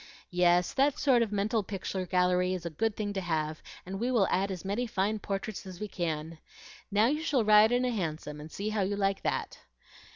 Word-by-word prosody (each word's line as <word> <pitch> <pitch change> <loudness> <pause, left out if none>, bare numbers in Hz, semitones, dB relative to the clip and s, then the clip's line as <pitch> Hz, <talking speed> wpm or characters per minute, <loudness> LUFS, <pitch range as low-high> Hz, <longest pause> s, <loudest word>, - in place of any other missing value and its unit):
"Yes, 180 0 +3
that 275 +1 +2
sort 260 -5 +4
of 225 -3 0
mental 210 +2 +1
picture 190 -2 -4
gallery 180 +1 +2
is 175 -2 -7
a 170 - -3
good 220 +7 -1
thing 205 -1 -3
to 195 - -2
have, 155 -3 -2 0.2
and 195 +2 -5
we 240 +3 0
will 225 -7 +3
add 195 +2 +1
as 190 -1 -6
many 215 +6 -1
fine 210 0 0
portraits 200 +1 -4
as 185 -2 -9
we 210 - -3
can. 160 -3 -4 0.5
Now 210 +2 +3
you 300 +6 +1
shall 275 -8 +1
ride 215 +1 +7
in 245 +1 +2
a 250 - +1
Hansom, 155 -7 -4
and 155 +1 -10
see 205 +6 -3
how 215 -1 0
you 195 +2 0
like 195 -1 0
that." - - -2
195 Hz, 220 wpm, -30 LUFS, 180-215 Hz, 0.5 s, ride